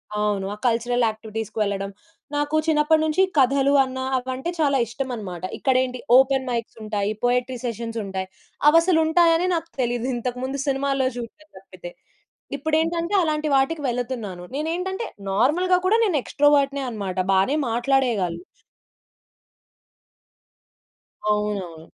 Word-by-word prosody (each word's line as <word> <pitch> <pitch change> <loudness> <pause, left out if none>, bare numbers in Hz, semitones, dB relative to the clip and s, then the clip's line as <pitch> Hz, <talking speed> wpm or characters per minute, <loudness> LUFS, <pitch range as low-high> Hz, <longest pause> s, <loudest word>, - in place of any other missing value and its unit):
అవును. 210 -2 0
ఆ - - -6
కల్చరల్ 240 +1 +1
యాక్టివిటీస్‌కి 220 0 -6
వెళ్ళడం. 195 -1 -1 0.5
నాకు 290 +1 0
చిన్నప్పటి 310 0 +3
నుంచి 315 +4 +1 0.2
కథలు 275 +1 +4
అన్న 260 0 -5 0.2
అవంటే 260 +5 -4
చాలా 280 -3 +3
ఇష్టమన్నమాట. 220 -8 -5
ఇక్కడేంటి? 255 -1 +1 0.2
ఓపెన్ 265 0 +3
మైక్స్ 235 -2 -3
ఉంటాయి. 210 -1 -1
పోయెట్రీ 250 +1 +1
సెషన్స్ 230 -1 -4
ఉంటాయి. 190 -1 -4 0.4
అవసలుంటాయని 330 +1 +4
నాకు 330 0 -4
తెలీదు. 240 0 0
ఇది - - -1
ఇంతకు 250 +1 -4
ముందు 265 +1 -3
సినిమాల్లో 275 -1 +1
చూడడం 275 +7 -9
తప్పితే. - - -11 0.7
ఇప్పుడేంటంటే 325 +5 0
అలాంటి 310 -1 -1
వాటికి 290 +3 +1
వెళ్తున్నాను. 235 -7 -4
నేనేంటంటే 360 +8 -2 0.3
నార్మల్‌గా 310 - +3
కూడా 420 +4 +4
నేను 380 -8 +1
ఎక్స్‌ట్రావర్ట్‌నే 280 -1 +2
అన్నమాట. 200 -5 -5 0.2
బానే 195 +10 +3
మాట్లాడేయగలను. 235 -8 +1 2.9
అవునవును. 195 -6 -3
260 Hz, 115 wpm, -23 LUFS, 225-305 Hz, 2.9 s, కథలు